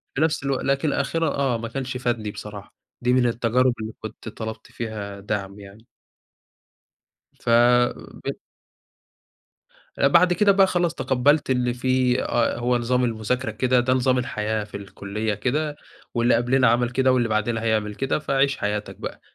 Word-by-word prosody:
في 135 Hz, -, -1 dB
نَفس 160 Hz, -2 st, +1 dB
الوقت 135 Hz, -1 st, -1 dB
لكن 140 Hz, +2 st, +1 dB
الآخِرة 145 Hz, +3 st, 0 dB
آه 135 Hz, -5 st, 0 dB
ما 115 Hz, 0 st, -5 dB
كنش 130 Hz, +1 st, -4 dB
فادني 120 Hz, -4 st, -2 dB
بصراحة، 105 Hz, -1 st, -9 dB, 0.3 s
دي 125 Hz, +1 st, +2 dB
من 125 Hz, -1 st, +3 dB
التجارب 120 Hz, +2 st, +2 dB
اللي 110 Hz, 0 st, -5 dB
كنت -, -, -8 dB
طلبت 110 Hz, +1 st, -7 dB
فيها 110 Hz, -4 st, -6 dB
دَعم 100 Hz, 0 st, -4 dB
يعني. 100 Hz, +3 st, -14 dB, 1.6 s
فبت 120 Hz, +1 st, +2 dB, 1.6 s
بعد 170 Hz, +6 st, +5 dB
كده 205 Hz, +2 st, +4 dB
بقى 195 Hz, -1 st, +5 dB
خلاص 175 Hz, -2 st, 0 dB
تقبّلت 140 Hz, +3 st, +2 dB
إن 125 Hz, -2 st, +1 dB
في 130 Hz, 0 st, +1 dB
آه، 120 Hz, -1 st, 0 dB
هو 120 Hz, +1 st, +1 dB
نظام 125 Hz, +1 st, 0 dB
المذاكرة 115 Hz, +1 st, -1 dB
كده، 125 Hz, +3 st, +2 dB
ده 125 Hz, +1 st, +2 dB
نظام 130 Hz, 0 st, +2 dB
الحياة 110 Hz, -3 st, -2 dB
في 105 Hz, -1 st, -8 dB
الكلّية 100 Hz, +2 st, -4 dB
كده، 145 Hz, +8 st, -1 dB, 0.4 s
واللي 120 Hz, 0 st, +3 dB
قبلنا 125 Hz, +2 st, +3 dB
عمل 120 Hz, +1 st, +2 dB
كده 130 Hz, +1 st, +2 dB
واللي 120 Hz, -2 st, +2 dB
بعدنا 110 Hz, +1 st, 0 dB
هيعمل 110 Hz, -2 st, 0 dB
كده، 135 Hz, +5 st, -1 dB
فعِش 140 Hz, -2 st, +1 dB
حياتك 105 Hz, 0 st, -3 dB
بقى، -, -, -7 dB
120 Hz, 150 wpm, -23 LUFS, 110-130 Hz, 1.6 s, بعد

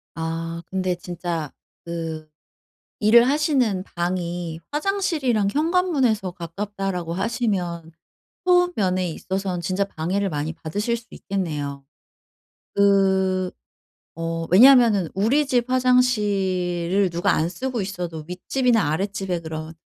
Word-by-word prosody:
아 165 Hz, +1 st, -4 dB
근데 185 Hz, -1 st, -1 dB
진짜 175 Hz, -3 st, -4 dB, 0.3 s
그 165 Hz, -2 st, -5 dB, 0.7 s
일을 235 Hz, +3 st, +6 dB
하시는 270 Hz, -, +1 dB
방이 175 Hz, -1 st, -2 dB
"화장실이랑 295 Hz, -, 0 dB
현관문에서 290 Hz, -, +1 dB
가깝다."라고 180 Hz, 0 st, -4 dB
하시면 190 Hz, -5 st, -2 dB, 0.5 s
소음 355 Hz, -1 st, +4 dB
면에 185 Hz, -3 st, 0 dB
있어서는 185 Hz, +1 st, -3 dB
진짜 185 Hz, +3 st, 0 dB
방해를 195 Hz, +2 st, -2 dB
많이 150 Hz, 0 st, -3 dB
받으실 205 Hz, +9 st, -2 dB
수 235 Hz, -, -13 dB
있겠네요. 150 Hz, -8 st, -4 dB, 0.9 s
그 190 Hz, -2 st, +3 dB, 0.7 s
어 165 Hz, 0 st, -2 dB
왜냐면은 225 Hz, -, +7 dB
우리 240 Hz, +10 st, +2 dB
집 245 Hz, -2 st, +1 dB
화장실을 200 Hz, -8 st, +2 dB
누가 170 Hz, +1 st, +1 dB
안 160 Hz, +2 st, 0 dB
쓰고 255 Hz, +1 st, -3 dB
있어도 175 Hz, -5 st, -5 dB
윗집이나 225 Hz, -, +1 dB
아랫집에 190 Hz, 0 st, -2 dB
그런 160 Hz, 0 st, -6 dB
190 Hz, 255 characters per minute, -23 LUFS, 170-230 Hz, 0.9 s, 왜냐면은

